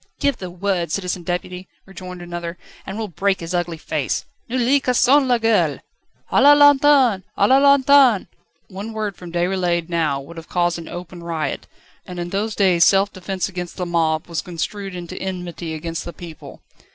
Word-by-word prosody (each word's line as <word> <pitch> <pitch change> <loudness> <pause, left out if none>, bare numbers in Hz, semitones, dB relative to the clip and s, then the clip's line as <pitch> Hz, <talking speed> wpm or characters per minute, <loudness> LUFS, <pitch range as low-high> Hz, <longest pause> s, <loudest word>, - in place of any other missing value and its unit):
"Give 280 -2 +1
the 185 -4 -7
word, 175 -2 -2
Citizen 180 0 -2
Deputy," 180 +1 -4 0.2
rejoined 185 -2 -9
another, 175 0 -6 0.3
"and 195 - -5
we'll 220 -1 -3
break 195 +2 0
his 165 +1 -6
ugly 175 -2 -1
face. - - -2 0.2
Nous 255 - -1
lui 260 +4 +3
casserons 260 +2 +3
la 245 -1 +3
gueule!" 225 -1 +2 0.5
"A - - +4
la 290 +2 +8
lanterne! 285 -7 +5
A 200 - +4
la 265 +3 +5
lanterne!" 280 -5 +5 0.4
One 200 +4 -7
word 215 -3 -3
from 175 -1 -10
Déroulède 175 -1 0
now 160 -5 0
would 165 +5 -11
have 165 - -10
caused 175 -1 0
an 165 - -9
open 175 0 -8
riot, 165 -2 -3 0.4
and 180 - -9
in 175 0 -4
those 210 +2 -2
days 185 -4 +4
self 195 +3 +3
defence 185 -1 -3
against 180 -3 -7
the 180 - -2
mob 160 -2 0
was 170 -2 -3
construed 195 +2 -5
into 175 -1 -7
enmity 180 -3 -5
against 165 0 -5
the 170 - -7
people. 165 -3 -11
180 Hz, 180 wpm, -21 LUFS, 170-215 Hz, 0.5 s, la